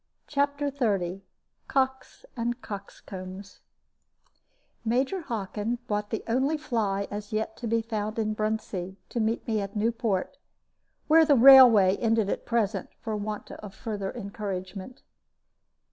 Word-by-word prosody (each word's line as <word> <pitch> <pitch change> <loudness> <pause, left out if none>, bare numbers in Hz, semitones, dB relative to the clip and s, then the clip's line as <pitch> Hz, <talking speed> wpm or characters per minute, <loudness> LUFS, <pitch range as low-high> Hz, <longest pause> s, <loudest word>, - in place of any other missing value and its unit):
CHAPTER 285 0 0
XXX 195 -9 -1 0.5
COCKS 265 - -1
AND 240 0 -2
COXCOMBS 195 -1 -8 1.2
Major 260 +11 0
Hockin 225 - -3
brought 210 -1 -2
the 220 - -3
only 265 +6 +1
fly 210 -9 -1
as 205 0 -6
yet 220 0 -2
to 240 - -5
be 230 0 +1
found 215 -1 -3
in 215 -1 0
Bruntsea, 215 -4 -3
to 240 - -3
meet 225 +1 0
me 220 -2 0
at 200 +1 -6
Newport, 220 -3 -1 0.7
where 320 +1 +7
the 295 -2 +5
railway 240 -7 +8
ended 225 -3 +1
at - - -4
present, 215 -4 0
for 220 -2 -3
want 210 0 -5
of 210 -2 -9
further 205 -5 -4
encouragement. 200 0 -6
220 Hz, 130 wpm, -27 LUFS, 200-240 Hz, 1.2 s, railway